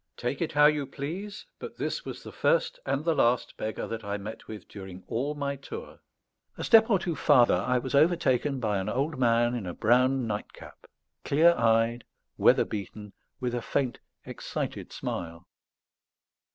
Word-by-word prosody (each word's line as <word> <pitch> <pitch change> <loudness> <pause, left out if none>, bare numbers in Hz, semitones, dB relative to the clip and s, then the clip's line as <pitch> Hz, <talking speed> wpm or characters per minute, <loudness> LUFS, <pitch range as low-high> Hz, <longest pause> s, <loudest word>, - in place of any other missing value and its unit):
Take 125 +5 -3
it 165 - -1
how 150 0 +6
you 150 -2 +3
please, 185 +10 -6
but - - -8
this - - -3
was - - -7
the - - -9
first - - +1
and 145 +3 -1
the 165 - +3
last 120 -4 +1
beggar 110 0 -4
that 115 -1 -5
I 100 0 -3
met 105 +2 -8
with 110 -1 -9
during 95 -2 -10
all 140 +6 -2
my 140 -1 -2
tour. 450 - -9 0.6
A - - -5
step 225 0 +6
or 200 - +5
two 175 -3 -3
farther 130 -7 +5
I 125 - +1
was 130 +2 -4
overtaken 145 -3 +2
by 105 -4 0
an 95 +2 -3
old 135 +5 -1
man 120 -1 +3
in 115 -7 -4
a 85 - -5
brown 125 +3 +3
nightcap, 105 -2 -7 0.4
clear 165 +4 +5
eyed, 115 -2 +2 0.3
weather - - +4
beaten, 105 0 -7 0.3
with 125 -2 -2
a 120 - -1
faint 125 +1 -1 0.3
excited - - -5
smile. 85 +1 -5
125 Hz, 170 wpm, -28 LUFS, 110-150 Hz, 0.6 s, how